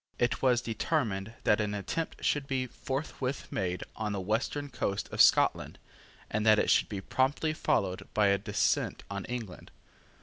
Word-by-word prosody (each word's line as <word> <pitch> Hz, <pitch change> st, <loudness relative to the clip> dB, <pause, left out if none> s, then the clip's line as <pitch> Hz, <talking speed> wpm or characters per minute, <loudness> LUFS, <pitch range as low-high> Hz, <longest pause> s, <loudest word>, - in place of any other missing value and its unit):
It 120 Hz, -, 0 dB
was 125 Hz, -2 st, +3 dB
determined 110 Hz, -4 st, -1 dB
that 105 Hz, -, +3 dB
an 105 Hz, 0 st, -2 dB
attempt 160 Hz, +11 st, -4 dB
should 145 Hz, -2 st, +1 dB
be 130 Hz, -2 st, 0 dB
forthwith 130 Hz, +2 st, -4 dB
made 90 Hz, -2 st, -2 dB
on 105 Hz, -1 st, -2 dB
the 100 Hz, -, -2 dB
western 115 Hz, +9 st, -1 dB
coast 100 Hz, -4 st, -2 dB
of -, -, +2 dB
Scotland, -, -, +4 dB, 0.5 s
and 110 Hz, 0 st, -1 dB
that 110 Hz, -1 st, +6 dB
it -, -, +2 dB
should -, -, +3 dB
be 100 Hz, -3 st, -4 dB
promptly 140 Hz, +8 st, 0 dB
followed 95 Hz, -11 st, 0 dB
by 105 Hz, -2 st, +4 dB
a 100 Hz, 0 st, +3 dB
descent 105 Hz, 0 st, 0 dB
on 100 Hz, -1 st, -4 dB
England. 115 Hz, -7 st, -6 dB
110 Hz, 165 wpm, -30 LUFS, 100-130 Hz, 0.5 s, that